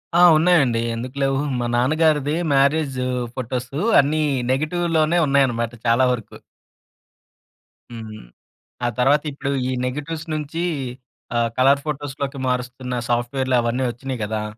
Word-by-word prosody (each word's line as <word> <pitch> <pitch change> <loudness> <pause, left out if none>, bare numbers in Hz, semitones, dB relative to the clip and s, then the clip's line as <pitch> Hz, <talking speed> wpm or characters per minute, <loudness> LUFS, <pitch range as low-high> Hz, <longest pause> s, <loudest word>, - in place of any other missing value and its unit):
ఆ! - - +5 0.2
ఉన్నాయండి, 155 -9 +3
ఎందుకు 125 +3 -6
లేవు. 135 0 +1 0.2
మా 120 - -1
నాన్నగారిది 150 +3 +2 0.2
మ్యారేజు 140 -2 +2 0.3
ఫోటోసు 125 +2 -4 0.2
అన్నీ 150 +3 +2 0.3
నెగిటివ్‌లోనే 160 +3 +1
ఉన్నాయనమాట 125 -5 +2
చాలా 120 +3 +4
వరుకు. 115 -4 -5 1.5
హ్మ్. 110 - -9 0.6
ఆ - - +2
తర్వాత 140 +4 +3
ఇప్పుడు 140 0 -4 0.2
ఈ - - -1
నెగిటివ్స్ 150 +5 -4
నుంచీ 155 +2 -3 0.7
ఆహ్, 115 -1 +1
కలర్ 135 +2 +4
ఫోటోస్‌‌లోకి 140 -1 -4
మారుస్తున్న 125 0 -3
సాఫ్ట్‌వేర్‌లవన్నీ 120 0 0
ఒచ్చినియి 130 +1 -6
గదా! 105 0 -2
135 Hz, 110 wpm, -21 LUFS, 125-150 Hz, 1.5 s, ఆ